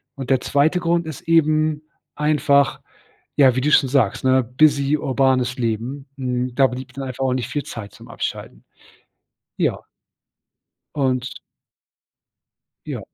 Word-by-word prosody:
und 135 -2 -7
der 130 -2 +3
2. 155 +5 +2
Grund 170 -1 0
ist 155 -5 -7
eben 155 -2 +2 0.3
einfach, 145 -2 +2 0.6
ja, 130 -3 +5
wie - - +1
du 150 +3 +1
schon 135 - +5
sagst, 130 -6 +1
ne, 130 0 +4
busy 140 +3 +2
urbanes 130 -2 +1
Leben, 120 +5 -3
hm, 125 -2 -2
da 135 +1 +5
blieb 125 +1 -8
dann 135 +1 -5
einfach 130 0 -4
auch 130 - +1
nicht 125 -3 -3
viel 145 - -3
Zeit 105 -3 -8
zum - - -15
Abschalten. - - -6 0.9
Ja. - - -1 1.1
Und 130 -3 -1 1.5
Ja. - - -5
135 Hz, 135 wpm, -21 LUFS, 125-150 Hz, 1.5 s, ja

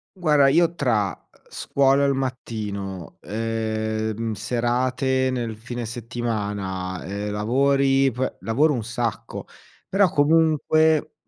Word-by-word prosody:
Guarda 150 -6 +4
io, 170 +4 +3
tra, 110 - +1
uhm, - - -8 0.3
scuola 140 0 +2
al 140 -1 +3
mattino, 105 - -5
ehm, 110 0 -2
serate 130 +3 0
nel 120 -3 -3
fine 120 +1 -6
settimana, 105 -6 -4
ehm, 100 +2 -4
lavori 135 +5 +2
p 130 +3 -3
lavoro 145 +7 +2
un 115 -4 -2
sacco; 115 -1 -4 0.4
però 195 -2 +3
comunque 155 0 +3
120 Hz, 105 wpm, -23 LUFS, 110-140 Hz, 0.4 s, Guarda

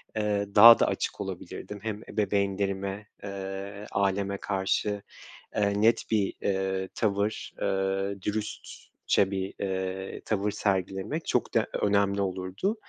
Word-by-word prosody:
eee, 105 -1 0
daha 115 +3 +11
da - - +4
açık - - -2
olabilirdim. 105 -1 -6
Hem 110 -1 -3
ebeveynlerime, 100 -1 -1 0.2
eee, 100 +1 -6
aileme 100 0 0
karşı, 100 +1 -1 0.5
eee, 100 0 +1
net 115 +1 +4
bir, 105 -3 +2
eee, 95 -1 -1
tavır, 105 0 -1
eee, 95 0 0
dürüstçe 105 -1 -2
bir, 95 0 -3
eee, 95 0 -3
tavır 105 -1 0
sergilemek 95 -1 -1
çok - - 0
de - - +2
önemli 100 -1 +2
olurdu. 95 - -1
100 Hz, 115 wpm, -28 LUFS, 95-105 Hz, 0.5 s, daha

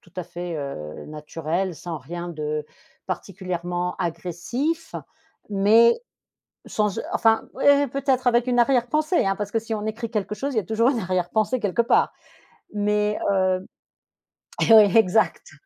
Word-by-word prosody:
tout 175 - -22
à 180 - -2
fait, 175 0 -6
heu, 105 - -6
naturel, 165 +4 -3
sans 165 +1 -6
rien 170 +6 -7
de 150 -2 -3 0.4
particulièrement 180 -1 -4
agressif 185 - -3 0.6
mais 220 +4 +5 0.7
sans 210 -2 -1
e - - -2
enfin, 225 0 +3 0.2
eh, 285 0 +5
peut-être 265 -1 -1
avec 240 0 +3
une 245 -1 +1
arrière-pensée, 275 - +2
hein, 195 0 +1
parce 205 0 -4
que 225 - +1
si 225 +1 -7
on 210 0 -4
écrit 225 +1 -4
quelque 210 -2 -2
chose, 280 +6 -3
il - - -5
y - - +4
a - - -9
toujours 225 +6 +2
une 260 - -1
arrière-pensée 185 +6 0
quelque 205 +3 +1
part. 235 - +2 0.6
Mais 210 0 +1
heu 185 -1 +1 1.1
e 220 - +11 0.2
exact. 220 0 +2
205 Hz, 150 wpm, -24 LUFS, 175-235 Hz, 1.1 s, e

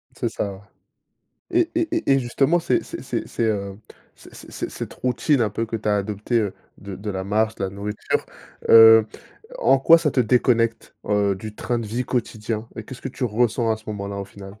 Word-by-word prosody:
C'est - - -2
ça, 100 -1 -3
ouais 95 - -12 0.9
et 345 -1 +3
et 335 0 +1
et 325 - +1
et 135 - +5
justement, 135 +7 +1
c'est - - +1
c'est - - -8
c'est - - -3
c'est, - - -4
heu, 100 -3 -1 0.4
c'est - - -16 0.2
c'est - - -4
cette - - -7
routine 130 +3 +1
un 110 -3 +1
peu 115 +3 -3
que 115 - -7
tu 110 -1 -2
as 105 - +3
adopté, 105 +4 -1
heu, 105 -4 -1 0.2
de 100 -1 -8
de 105 +2 -5
la 95 -1 -4
marche, 110 +3 0
de 100 - -3
la 95 - -3
nourriture, 100 +2 -3 0.4
heu, 115 -1 +9 0.5
en 135 - +4
quoi, 165 +5 +7
ça 160 -3 0
te 130 - +2
déconnecte, 115 -1 +1
heu, 100 -1 +2
du 105 +3 -8
train 120 -1 -2
de 115 - -5
vie 120 +4 -2
quotidien? 115 -2 -3
Et 110 - -6
qu'est-ce 125 +3 -10
que - - -3
tu 130 0 -4
ressens 115 0 +1
à - - -2
ce 110 - -17
moment-là, 100 -1 -5
au 100 - -4
final? 100 +1 -12
110 Hz, 220 wpm, -22 LUFS, 100-125 Hz, 0.9 s, heu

